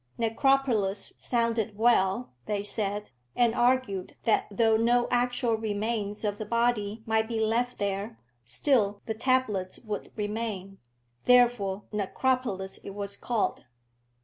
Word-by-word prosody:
Necropolis 225 -4 +1
sounded 230 -3 0
well, 225 -1 +2 0.2
they 205 -1 -1
said, 205 0 -2 0.2
and 240 -2 +3
argued 240 -6 +1
that 225 - +2
though 225 +2 +3
no 240 +2 +3
actual 245 -1 +1
remains 215 -1 -2
of 205 -1 -1
the 215 - -3
body 230 -2 0
might 220 -1 +1
be 230 -1 -2
left 235 +3 0
there, 200 +3 -3 0.3
still 205 - +1
the 220 - -2
tablets 220 -6 0
would 215 -3 -5
remain. 205 -3 -4 0.5
Therefore 235 -6 +4
Necropolis 210 -1 -1
it 195 - -9
was 200 -1 -4
called. 235 - -1
220 Hz, 120 wpm, -28 LUFS, 205-240 Hz, 0.5 s, Therefore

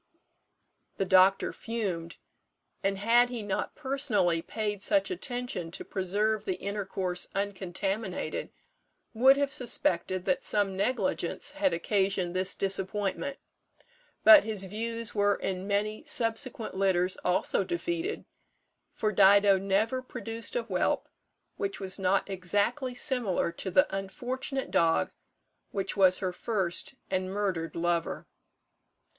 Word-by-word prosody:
The 195 - 0
doctor 190 +1 +4
fumed, 185 -8 -4 0.6
and, 195 0 0
had 235 +4 +4
he 240 -3 -5
not 200 -2 -3
personally 260 - +1
paid 210 +1 -3
such 300 - +1
attention 245 - -3
to 170 - -6
preserve 205 +3 0
the 190 -3 -2
intercourse 195 -3 -2
uncontaminated, 195 0 -3 0.6
would 260 +4 +6
have 285 -1 0
suspected 185 -7 0
that 185 -2 +1
some 200 -2 +2
negligence 250 +6 0
had 295 -1 +1
occasioned 190 0 0
this 185 +1 0
disappointment; 195 +7 -2 0.9
but 315 -2 +10
his 215 -3 -3
views 230 +3 -4
were 205 -1 +3
in 190 0 -4
many 210 +3 -1
subsequent 250 -3 -1
litters 190 -1 +1
also 180 +2 +1
defeated, 345 - -3 0.7
for 215 - -1
Dido 200 0 +6
never 205 +6 +1
produced 230 - -5
a - - 0
whelp - - -1 0.5
which 195 -1 -3
was 190 0 0
not 190 +1 +1
exactly 205 +8 -1
similar 245 - 0
to 190 - -5
the 185 +1 +5
unfortunate 250 +8 -4
dog 165 -1 +2 0.6
which 195 -1 -3
was 185 -2 +5
her 185 -2 -2
first 190 +3 -2 0.2
and 185 0 -1
murdered 185 -6 -2
lover. 170 0 -1
200 Hz, 120 wpm, -29 LUFS, 185-230 Hz, 0.9 s, but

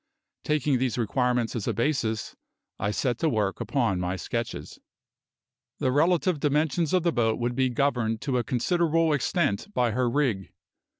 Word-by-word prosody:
Taking 150 -4 +1
these 130 -1 -1
requirements 120 +1 0
as 110 - -3
a - - 0
basis, 115 -4 -1 0.4
I 100 - 0
set 120 +2 -1
to 165 - +2
work 105 -6 -1
upon 115 -10 0
my 90 +1 -2
sketches. 110 - -5 1.0
The 130 - 0
relative 170 +3 +2
dimensions 150 +2 +1
of 185 -2 +2
the 170 - +2
boat 115 -2 +1
would 120 0 -1
be 130 0 +2
governed 120 -4 0
to 130 -3 0
a - - -1
considerable 165 - +1
extent 145 - 0
by 120 -2 +2
her 125 +2 +1
rig. 120 -8 -1
125 Hz, 160 wpm, -26 LUFS, 115-150 Hz, 1.0 s, to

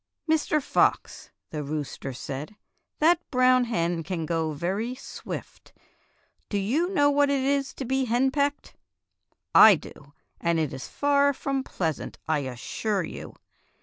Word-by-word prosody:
"Mr. 310 -1 +2
Fox," 285 - 0 0.2
the 150 - -3
rooster 145 -2 -4
said, 140 +9 -6 0.4
"that 335 +3 +4
brown 255 -1 +4
hen 170 -7 -1
can 165 0 -3
go 160 -1 -1
very 195 - -2
swift. 255 - -9 0.8
Do 205 - -1
you 265 - 0
know 290 -7 +3
what 285 0 +3
it 275 -2 +1
is 275 0 +1
to 270 - -5
be 265 +1 0
henpecked.^ 270 +4 0 0.8
I 215 -3 +9
do, 145 -2 -12 0.3
and 170 0 +1
it 155 -4 -1
is 130 - -6
far 285 0 +2
from 270 0 -2
pleasant, 165 - -3
I 155 -2 +2
assure 145 - -2
you. - - -8
225 Hz, 140 wpm, -26 LUFS, -, 0.8 s, I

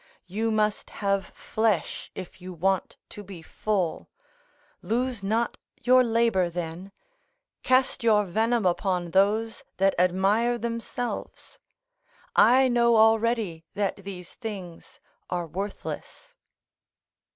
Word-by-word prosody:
You 215 +5 -2
must 215 -1 0 0.2
have 195 -1 +1
flesh, 215 -6 -1
if 185 0 -9
you 185 0 -7
want 190 +2 0
to 210 - -9
be 185 -4 -10
full; 190 -2 -2 0.7
lose 235 +4 -1
not 220 +4 -1 0.2
your 255 +1 +6
labour 230 -6 +2
then; 175 +2 -6 0.7
cast 255 -1 +2
your 210 -2 +4
venom 225 +4 +1
upon 180 -1 0
those 210 +5 +2
that 195 0 +3
admire 195 +7 +2
themselves; 235 +1 -5 0.8
I 260 +2 +6
know 235 -2 +4
already 220 -6 +3
that 200 -2 -1
these 190 -3 -9
things 195 -7 -8 0.3
are 175 -1 -2
worthless." 200 - -6
205 Hz, 105 wpm, -26 LUFS, 185-230 Hz, 0.8 s, your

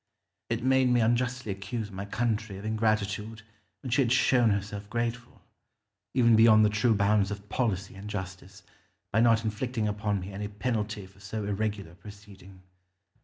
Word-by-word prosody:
It - - -2
made 130 0 +3
me 125 0 +3
unjustly 120 0 0
accuse 100 +3 -5
my 95 +1 -6
country 110 -2 -2
of 100 - -9
ingratitude 110 0 -1 0.4
when 130 - -5
she 130 - +3
had 120 -3 +1
shown 125 -2 +4
herself 100 0 -3
grateful, 120 +1 -4 0.7
even 120 -3 +5
beyond 110 -1 +7
the 105 - +2
true 110 +2 +2
bounds 100 -1 +2
of 105 0 -7
policy 100 -5 -1
and 100 +2 -9
justice, 95 -1 -7 0.5
by 110 - +2
not 115 -1 +4
inflicting 110 +1 -2
upon 105 -1 -1
me 95 +2 -7
any 105 +1 -4
penalty 105 -1 -3
for 95 +1 -19
so 105 +2 -5
irregular 100 -3 -2
a - - -17
proceeding. 100 -2 -14
105 Hz, 165 wpm, -28 LUFS, 100-115 Hz, 0.7 s, beyond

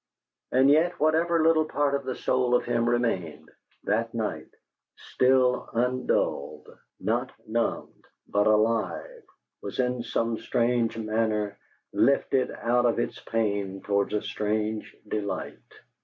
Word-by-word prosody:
And 135 +2 +5
yet, 170 +4 +3
whatever 160 +2 +2
little 160 -1 +4
part 145 -2 0
of 140 -1 -1
the 130 -1 -3
soul 125 -1 +1
of - - +1
him 120 -1 +1
remained, 115 -10 -1 0.3
that 115 +2 -1
night, 110 -2 -3 0.5
still 130 -1 +2
undulled, 115 - -1 0.3
not 120 +4 -1 0.2
numbed, 115 +1 -2 0.2
but 105 +1 +2
alive, 115 - +1 0.4
was - - -6
in 125 -1 0
some 115 -1 -1
strange 115 -1 0
manner 110 -2 -1 0.3
lifted 135 -1 +2
out 120 +1 +1
of 115 - +1
its - - -2
pain 100 -4 -2
towards 100 +1 0
a 105 - -1
strange 105 0 -2
delight. 105 -1 -4
115 Hz, 125 wpm, -27 LUFS, 110-130 Hz, 0.5 s, And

